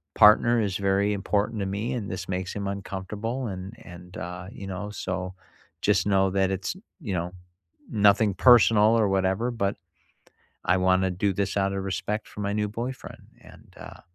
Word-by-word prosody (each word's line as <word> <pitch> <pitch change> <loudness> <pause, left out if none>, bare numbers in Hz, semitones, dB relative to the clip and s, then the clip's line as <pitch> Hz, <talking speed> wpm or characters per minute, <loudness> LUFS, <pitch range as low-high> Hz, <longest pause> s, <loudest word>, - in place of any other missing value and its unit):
partner 120 +3 +6
is 100 -3 -1
very 100 +1 +1
important 105 +2 -1
to - - -1
me, 100 +5 -2
and 105 -6 -4
this 95 -1 -5
makes 95 0 -3
him 100 -1 -4
uncomfortable," 100 +6 -4
and 95 +1 -6
and, 90 0 -11
uh, 90 +1 -6
you 95 - -8
know, 95 +2 -5
"So 95 -2 -4 0.5
just - - +2
know 95 -1 +3
that 95 -1 +2
it's," 95 - -3 0.3
you 110 -10 -4
know, 90 0 -2 0.6
"nothing 105 -1 +4
personal 115 -1 +6
or 105 - +3
whatever, 95 +5 +1
but 100 -4 -1 0.9
I 90 - +4
wanna 95 0 +2
do 95 +2 0
this 100 +1 -2
out 100 0 +1
of 95 - -3
respect 105 +2 -3
for 105 - -8
my 100 - -1
new 105 0 0
boyfriend." 120 +5 -6 0.2
And, - - -17
uh, - - -11
100 Hz, 175 wpm, -26 LUFS, 95-105 Hz, 0.9 s, partner